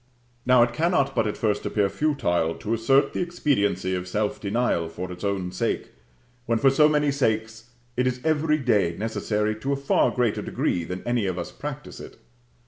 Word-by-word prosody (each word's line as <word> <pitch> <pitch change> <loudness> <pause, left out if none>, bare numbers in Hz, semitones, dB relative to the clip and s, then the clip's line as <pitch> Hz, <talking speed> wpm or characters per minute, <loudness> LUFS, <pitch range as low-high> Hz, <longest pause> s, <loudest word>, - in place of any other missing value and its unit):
Now, 125 -1 +6
it 120 0 -1
cannot 140 -2 +1
but 115 -4 +1
at 105 - -3
first 105 -2 0
appear 105 -2 +1
futile 95 - 0
to 110 - -3
assert 135 +5 +3
the - - -3
expediency 100 - 0
of 90 0 -3
self 105 +3 -2
denial 100 -5 0
for 90 +2 -6
its 90 +2 -9
own 95 -3 -1
sake, 90 - -2 0.6
when, 115 0 +2
for 135 +3 +4
so 150 +3 +5
many 150 -1 +2
sakes, 110 -3 -1 0.3
it 125 +1 +1
is 125 0 -1
every 155 -1 +2
day 105 - +1
necessary 110 -1 -1
to 135 +6 -2
a - - +1
far 140 0 +2
greater 120 -4 0
degree 85 - -1
than 90 +2 -6
any 120 -4 0
of 90 -1 -2
us 85 - -5
practise - - -7
it. - - -11
115 Hz, 190 wpm, -25 LUFS, 100-135 Hz, 0.6 s, Now